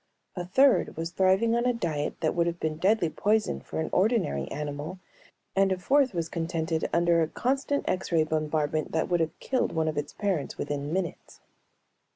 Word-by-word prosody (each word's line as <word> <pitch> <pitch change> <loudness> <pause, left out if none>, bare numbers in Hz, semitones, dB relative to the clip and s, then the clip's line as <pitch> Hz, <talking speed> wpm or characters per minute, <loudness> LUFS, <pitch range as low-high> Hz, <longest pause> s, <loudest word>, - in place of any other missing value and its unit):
A 180 - -3
third 260 - +3
was 165 +1 -3
thriving 190 +5 +3
on 235 +1 +1
a 250 - +3
diet 155 -10 -3
that 155 - +1
would 170 0 +1
have 170 0 -3
been 155 -1 -2
deadly 190 +1 +3
poison 210 +6 0
for - - -6
an 160 - -2
ordinary 185 - +1
animal 150 +4 -5 0.6
and 195 0 +3
a 190 - +1
fourth 270 +7 +3
was 165 -2 -1
contented 165 -1 -2
under 170 0 +3
a 160 - +2
constant 270 - -1
X 185 0 -1
ray 165 -2 +4
bombardment 155 0 -1
that 160 +2 0
would 175 -1 +2
have 160 -1 -2
killed 260 -1 -1
one 160 -1 0
of 155 -2 0
its 145 - -6
parents 195 -8 -2
within 145 0 -3
minutes. 175 -2 -4
170 Hz, 190 wpm, -27 LUFS, 155-195 Hz, 0.6 s, ray